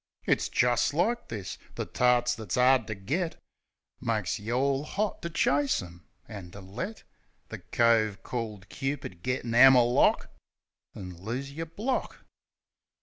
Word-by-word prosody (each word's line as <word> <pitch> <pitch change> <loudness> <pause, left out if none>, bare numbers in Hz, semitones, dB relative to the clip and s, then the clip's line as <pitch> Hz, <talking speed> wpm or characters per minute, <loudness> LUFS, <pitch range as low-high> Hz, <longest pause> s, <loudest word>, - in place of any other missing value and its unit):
It's - - +1
jest 120 +3 +2
like 235 +8 0
this. 100 -5 -6 0.2
The - - -3
tarts 125 0 +2
that's 110 -5 -4
'ard 125 -2 +4
ter 110 - -4
get 155 - -3 0.6
Makes 110 -2 -1
you 110 +3 -4
all 135 +2 +1
'ot 200 +7 -2
to 170 - -4
chase 145 -3 +2
'em, 85 -2 -11 0.2
an' 95 -4 -8
to 100 - -9
let 120 - -6 0.5
The - - -7
cove 110 -4 +2
called 110 -5 -5
Cupid 135 -10 -4
get 125 +4 -2
an 115 - -3
'ammer 130 +1 +8
lock; 120 +1 +2 0.6
An' 90 -3 -8
lose 125 +7 -4
yer 165 +3 -5
block. 215 +11 -3
125 Hz, 145 wpm, -28 LUFS, 105-140 Hz, 0.6 s, ammer